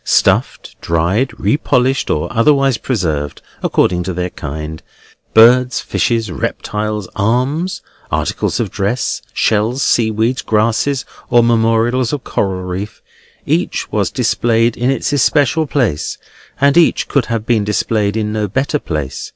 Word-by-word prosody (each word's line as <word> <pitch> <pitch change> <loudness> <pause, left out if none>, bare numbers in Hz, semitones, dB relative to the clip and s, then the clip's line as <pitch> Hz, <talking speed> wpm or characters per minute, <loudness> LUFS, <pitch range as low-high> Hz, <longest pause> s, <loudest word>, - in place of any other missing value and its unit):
Stuffed, - - +1
dried, 85 +10 +1
repolished, 130 +4 +1
or 75 - 0
otherwise 135 +1 +3
preserved, 80 - -2 0.2
according 90 -1 +1
to 90 +1 -3
their 90 0 -2
kind; 75 +2 -6 0.5
birds, 125 +3 +6
fishes, 115 -4 -1
reptiles, 105 +3 -3
arms, 130 - 0 0.3
articles - - -1
of - - -2
dress, 105 +6 -1
shells, 115 +5 +1
seaweeds, 115 +3 +1
grasses, 115 +4 0 0.2
or 120 -1 +5
memorials 115 +1 +2
of 140 -4 -3
coral 95 -2 -2
reef; 95 +4 -6 0.4
each - - -1
was - - 0
displayed 115 0 +1
in 125 +2 0
its 135 +1 -1
especial 145 +3 +2
place, 120 - -1 0.4
and 140 +2 +4
each 170 - +3
could 140 -5 0
have 115 -2 -2
been 115 -3 +2
displayed 105 0 0
in 105 -1 -2
no 105 -1 -1
better 135 +8 -1
place. 75 - -4
115 Hz, 130 wpm, -16 LUFS, 100-130 Hz, 0.5 s, birds